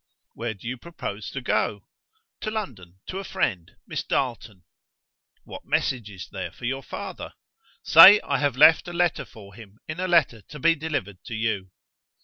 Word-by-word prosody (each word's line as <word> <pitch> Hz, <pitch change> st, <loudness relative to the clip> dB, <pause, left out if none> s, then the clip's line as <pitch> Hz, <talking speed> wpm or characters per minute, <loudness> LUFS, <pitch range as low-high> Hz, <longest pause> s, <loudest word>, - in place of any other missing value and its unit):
"Where 115 Hz, -1 st, -5 dB
do 100 Hz, -, -11 dB
you 125 Hz, +1 st, -4 dB
propose 110 Hz, -11 st, -7 dB
to 135 Hz, -, -6 dB
go?" 105 Hz, -4 st, -1 dB, 0.5 s
"To -, -, -4 dB
London; 110 Hz, -, -6 dB
to 190 Hz, -, -5 dB
a -, -, -6 dB
friend 100 Hz, -, -3 dB
Miss -, -, -4 dB
Darleton." 110 Hz, -7 st, -3 dB, 0.8 s
"What -, -, -10 dB
message 120 Hz, -5 st, -1 dB
is 95 Hz, -3 st, -9 dB
there -, -, -5 dB
for -, -, -10 dB
your 135 Hz, +2 st, -2 dB
father?" -, -, -8 dB, 0.5 s
"Say 205 Hz, +2 st, +9 dB
I -, -, -1 dB
have 145 Hz, -4 st, 0 dB
left 160 Hz, +4 st, +6 dB
a 175 Hz, -, -7 dB
letter 175 Hz, 0 st, 0 dB
for 100 Hz, -3 st, -15 dB
him 105 Hz, -1 st, -14 dB
in 155 Hz, +2 st, -6 dB
a 185 Hz, -, -1 dB
letter 155 Hz, -, +2 dB
to 145 Hz, +9 st, -12 dB
be 165 Hz, +4 st, +3 dB
delivered 145 Hz, -, -5 dB
to 115 Hz, -, -6 dB
you." 110 Hz, -4 st, -2 dB
120 Hz, 175 wpm, -24 LUFS, 105-160 Hz, 0.8 s, Say